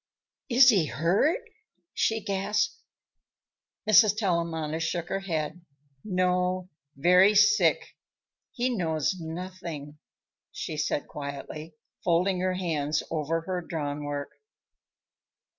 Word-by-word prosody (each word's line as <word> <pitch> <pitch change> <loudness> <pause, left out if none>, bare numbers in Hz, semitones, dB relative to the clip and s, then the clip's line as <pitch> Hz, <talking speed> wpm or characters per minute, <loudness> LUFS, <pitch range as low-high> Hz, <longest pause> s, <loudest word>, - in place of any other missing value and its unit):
"Is 250 +1 +7
he 190 -9 +4
hurt?" 190 - +1 0.5
she 225 0 +1
gasped. 200 +1 0 1.1
Mrs. 210 0 +6
Tellamantez 165 -5 -1
shook 170 +1 -2
her 195 - -1
head. 170 -2 -3 0.4
"No; 180 -1 0 0.3
very 180 +8 +5
sick. 210 -5 +4 0.6
He 250 -1 -1
knows 160 -1 0
nothing," 165 -3 -7 0.5
she 155 - -5
said 150 -1 -1
quietly, 150 +2 -7 0.3
folding 180 +2 +2
her 185 0 0
hands 155 -5 -1
over 160 +1 -1
her 180 +2 -3
drawn 150 -3 -4
work. 145 -1 -4
175 Hz, 100 wpm, -27 LUFS, 155-195 Hz, 1.1 s, Is